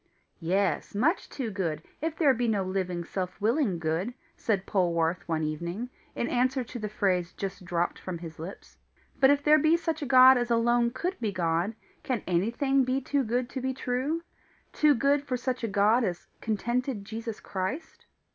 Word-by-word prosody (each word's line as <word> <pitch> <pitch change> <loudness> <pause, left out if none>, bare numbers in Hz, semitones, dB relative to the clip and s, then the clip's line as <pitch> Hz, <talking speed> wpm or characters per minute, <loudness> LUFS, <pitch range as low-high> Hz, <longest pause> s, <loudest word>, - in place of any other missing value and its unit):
"Yes, 190 +4 0
much 290 - +1
too 245 -6 -4
good, 165 -6 -2 0.2
if 320 0 -2
there 295 -5 +4
be 240 0 0
no 205 -3 +1
living, 185 -2 -2
self 185 +2 -4
willing 225 - +1
Good," 165 +8 -2 0.2
said 200 -4 -1
Polwarth 170 -3 0
one 160 -2 0
evening, 170 +10 -3 0.2
in 235 - -1
answer 255 +1 +1
to 240 +1 -8
the 215 -1 -3
phrase 185 -4 0
just 195 -1 -5
dropped 175 0 -1
from 185 -2 -5
his 165 -2 -9
lips. 175 +5 -9 0.4
"But 265 -1 +6
if 285 0 +3
there 305 +1 +6
be 315 +3 +4
such 325 -2 -2
a 285 - -3
God 260 0 +8
as 240 0 -1
alone 235 0 +3
could 360 +10 -3
be 220 -3 -1
God, 175 +3 0 0.3
can 250 -6 -2
anything 235 - +2
be 255 +1 0
too 275 +1 0
good 245 +2 -1
to 260 - -4
be 260 0 -2
true? 265 +7 -1 0.5
too 300 -1 +4
good 280 +4 +2
for 255 -3 -2
such 250 0 -3
a - - +1
God 210 +4 +3
as 175 -5 -2 0.2
contented 235 +1 -1
Jesus 225 +1 -5
Christ?" 205 - -5
230 Hz, 185 wpm, -28 LUFS, 185-260 Hz, 0.5 s, God